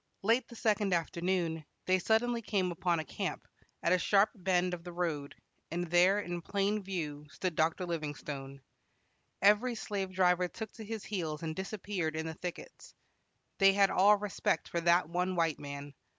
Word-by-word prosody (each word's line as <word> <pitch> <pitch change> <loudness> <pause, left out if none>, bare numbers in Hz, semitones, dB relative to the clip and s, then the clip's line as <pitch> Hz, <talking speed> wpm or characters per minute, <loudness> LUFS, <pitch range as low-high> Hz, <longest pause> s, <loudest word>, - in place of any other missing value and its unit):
Late 230 +4 +3
the 235 - -12
second 210 -4 +2
afternoon, 170 -1 -1 0.2
they 185 0 +3
suddenly 230 +4 +2
came 195 -5 0
upon 170 0 0
a 160 - -4
camp, - - -4 0.4
at 170 - +3
a 180 - +3
sharp 200 +3 +4
bend 180 -3 +1
of 170 -1 -5
the 175 - -7
road, 165 -5 -3 0.3
and 175 +1 -3
there, 180 +3 +5
in 175 -3 -4
plain 200 +4 0
view, 155 -6 -4
stood 185 +2 -3
Dr. 165 +4 +1
Livingstone. 145 -4 -5 0.8
Every 210 +5 +5
slave 200 -3 -3
driver 180 -1 +3
took 220 +4 -7
to 225 - -10
his 220 0 -5
heels 165 -7 -3
and 160 -1 -3
disappeared 190 -4 -3
in 160 0 -2
the 160 - -4
thickets. 175 +2 -8 0.6
They 195 -1 +7
had 195 0 +4
all 205 +3 +6
respect 200 -5 -1
for 170 - -1
that 170 +1 +4
one 180 +2 -1
white 165 -3 +1
man. 140 0 -7
180 Hz, 170 wpm, -32 LUFS, 165-200 Hz, 0.8 s, They